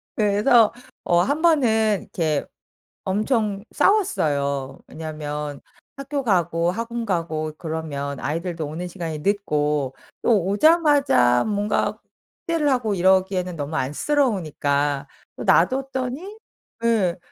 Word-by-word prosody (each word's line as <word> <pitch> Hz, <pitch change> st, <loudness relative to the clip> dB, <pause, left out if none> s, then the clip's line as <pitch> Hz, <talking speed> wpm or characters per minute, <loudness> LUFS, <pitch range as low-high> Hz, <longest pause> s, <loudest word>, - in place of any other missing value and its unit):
그래서 215 Hz, +2 st, +4 dB, 0.3 s
어 175 Hz, -, +3 dB
1 285 Hz, -, 0 dB
번은 220 Hz, -, +3 dB
이렇게 155 Hz, -4 st, -1 dB, 0.6 s
엄청 210 Hz, 0 st, 0 dB
싸웠어요. 140 Hz, -, +1 dB
왜냐면 150 Hz, -2 st, -6 dB, 0.4 s
학교 275 Hz, 0 st, -3 dB
가고 175 Hz, -5 st, +1 dB
학원 230 Hz, +3 st, -4 dB
가고 160 Hz, -5 st, -2 dB
그러면 150 Hz, -4 st, -4 dB
아이들도 165 Hz, +1 st, -3 dB
오는 165 Hz, +4 st, -5 dB
시간이 165 Hz, -4 st, -5 dB
늦고 150 Hz, -7 st, 0 dB, 0.3 s
또 210 Hz, -7 st, +3 dB
오자마자 275 Hz, -, +4 dB
뭔가 205 Hz, 0 st, -1 dB, 0.5 s
숙제를 330 Hz, -4 st, +1 dB
하고 235 Hz, -6 st, 0 dB
이러기에는 185 Hz, -1 st, +2 dB
너무 145 Hz, +1 st, -4 dB
안쓰러우니까 145 Hz, -, 0 dB, 0.3 s
또 -, -, -5 dB
놔 170 Hz, -, +5 dB
뒀더니 270 Hz, -, -4 dB, 0.5 s
예 200 Hz, -7 st, +2 dB
185 Hz, 245 characters per minute, -23 LUFS, 155-235 Hz, 0.6 s, 놔